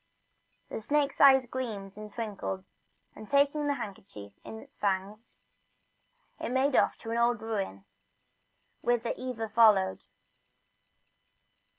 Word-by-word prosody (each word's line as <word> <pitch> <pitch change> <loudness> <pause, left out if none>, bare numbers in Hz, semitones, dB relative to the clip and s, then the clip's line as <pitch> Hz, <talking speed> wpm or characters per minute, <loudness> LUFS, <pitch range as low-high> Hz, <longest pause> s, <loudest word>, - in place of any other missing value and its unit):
The - - -5
snake's 285 +4 0
eyes 265 -2 +7
gleamed 220 -6 -5
and 210 0 -9
twinkled, 200 -4 -5 0.5
and 215 - -11
taking 285 +1 +2
the 285 - +1
handkerchief 145 - -8
into 220 - -8
his 280 0 -18
fangs, 200 +3 -3 1.0
he - - -3
made 260 +2 +2
off - - +3
to 225 - -6
an 230 - 0
old 235 0 +2
ruin, 195 - -4 1.0
whither 240 -1 +1
Eva 245 -3 -4
followed. 210 -4 +4
225 Hz, 115 wpm, -29 LUFS, 200-260 Hz, 1.0 s, eyes